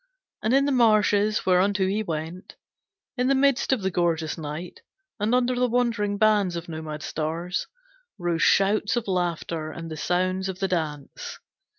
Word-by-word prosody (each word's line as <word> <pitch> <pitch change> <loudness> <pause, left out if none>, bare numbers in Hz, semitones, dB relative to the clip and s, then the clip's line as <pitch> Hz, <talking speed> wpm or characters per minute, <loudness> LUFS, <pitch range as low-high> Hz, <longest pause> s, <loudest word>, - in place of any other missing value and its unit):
And 220 - 0
in 275 0 +4
the 285 - +1
marshes 215 -3 +3
whereunto 190 +2 +3
he 200 +3 0
went, 165 0 -5 0.6
in 250 +1 +1
the 275 - +3
midst 275 -1 +2
of 250 -7 +1
the 190 - 0
gorgeous 165 -3 0
night, 160 +2 -7 0.4
and 215 +4 +2
under 250 0 +2
the 250 0 +1
wandering 230 -4 0
bands 205 -4 +3
of 170 0 -5
nomad 155 -2 -6
stars, 165 +3 -3 0.5
rose 175 -3 -1
shouts 205 +2 +3
of 240 -3 -2
laughter 170 -3 -2
and 165 0 -8
the 155 - -5
sounds 185 +3 0
of 185 - -5
the 195 0 0
dance. 155 -6 -4
190 Hz, 165 wpm, -25 LUFS, 165-215 Hz, 0.6 s, in